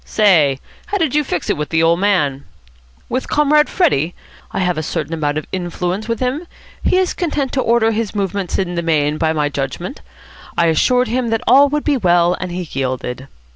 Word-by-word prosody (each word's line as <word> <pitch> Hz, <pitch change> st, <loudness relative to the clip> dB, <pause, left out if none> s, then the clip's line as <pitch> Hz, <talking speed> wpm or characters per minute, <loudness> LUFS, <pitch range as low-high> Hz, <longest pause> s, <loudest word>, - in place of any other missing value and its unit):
Say, 160 Hz, -11 st, +3 dB, 0.3 s
how 405 Hz, -, -1 dB
did 320 Hz, -8 st, 0 dB
you 300 Hz, 0 st, +2 dB
fix 180 Hz, -, -3 dB
it -, -, -1 dB
with 150 Hz, 0 st, -3 dB
the 160 Hz, 0 st, +2 dB
old 165 Hz, +1 st, +3 dB
man?" 150 Hz, -9 st, +1 dB, 0.6 s
"With 255 Hz, +2 st, -3 dB
Comrade 300 Hz, 0 st, +3 dB
Freddie? 175 Hz, -, +1 dB, 0.4 s
I -, -, -5 dB
have 180 Hz, -2 st, +1 dB
a 155 Hz, -, -2 dB
certain 160 Hz, 0 st, -3 dB
amount 150 Hz, -2 st, -1 dB
of 155 Hz, -, -3 dB
influence 180 Hz, +3 st, -3 dB
with 230 Hz, -1 st, -2 dB
him. 265 Hz, +7 st, -2 dB, 0.4 s
He -, -, +2 dB
is 370 Hz, -1 st, +1 dB
content 295 Hz, -6 st, -2 dB
to 265 Hz, -, 0 dB
order 230 Hz, -2 st, +3 dB
his 225 Hz, -1 st, -2 dB
movements 200 Hz, -2 st, -2 dB
in 180 Hz, -2 st, -1 dB
the 170 Hz, -, -1 dB
main 155 Hz, -2 st, +1 dB
by 160 Hz, -1 st, +2 dB
my 150 Hz, -2 st, 0 dB
judgment. 145 Hz, -, -5 dB, 0.6 s
I 170 Hz, -, +3 dB
assured 250 Hz, -, +2 dB
him 240 Hz, +1 st, -1 dB
that 225 Hz, -1 st, -1 dB
all 280 Hz, +1 st, +6 dB
would 295 Hz, +1 st, -1 dB
be 290 Hz, -3 st, +1 dB
well, 175 Hz, -4 st, +3 dB
and 185 Hz, -1 st, -4 dB
he 180 Hz, -1 st, -4 dB
yielded." 130 Hz, -1 st, -3 dB
185 Hz, 205 wpm, -18 LUFS, 160-250 Hz, 0.6 s, all